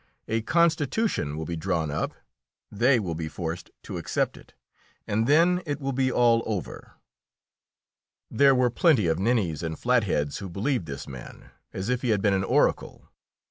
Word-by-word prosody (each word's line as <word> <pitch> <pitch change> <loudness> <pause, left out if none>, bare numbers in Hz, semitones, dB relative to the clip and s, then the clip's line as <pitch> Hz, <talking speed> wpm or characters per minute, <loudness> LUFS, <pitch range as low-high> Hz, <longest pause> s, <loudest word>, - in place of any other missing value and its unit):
A 115 +1 0
constitution 160 - +1
will 80 - -4
be 85 - -4
drawn 80 -3 -1
up, 75 - -3 0.6
they 120 +4 +3
will 90 -6 -3
be 80 0 -4
forced 80 +2 -5
to - - -6
accept - - -1
it, - - -17 0.5
and 110 +3 0
then 170 +5 +4
it 145 0 -2
will 135 -1 -2
be 130 0 +1
all 120 -2 +4
over." 105 -5 -5 1.4
There 140 -1 +5
were 125 -1 +2
plenty 140 - +3
of 80 0 +1
ninnies 100 -8 0
and 80 -2 -4
flatheads 105 - 0
who 95 - -6
believed 100 - -2
this 70 -2 -7
man 65 -3 -11 0.2
as 95 +2 -5
if 125 0 0
he 125 - -1
had 105 -3 +2
been 100 -2 +3
an 95 -1 +1
oracle. - - 0
110 Hz, 170 wpm, -26 LUFS, 85-130 Hz, 1.4 s, There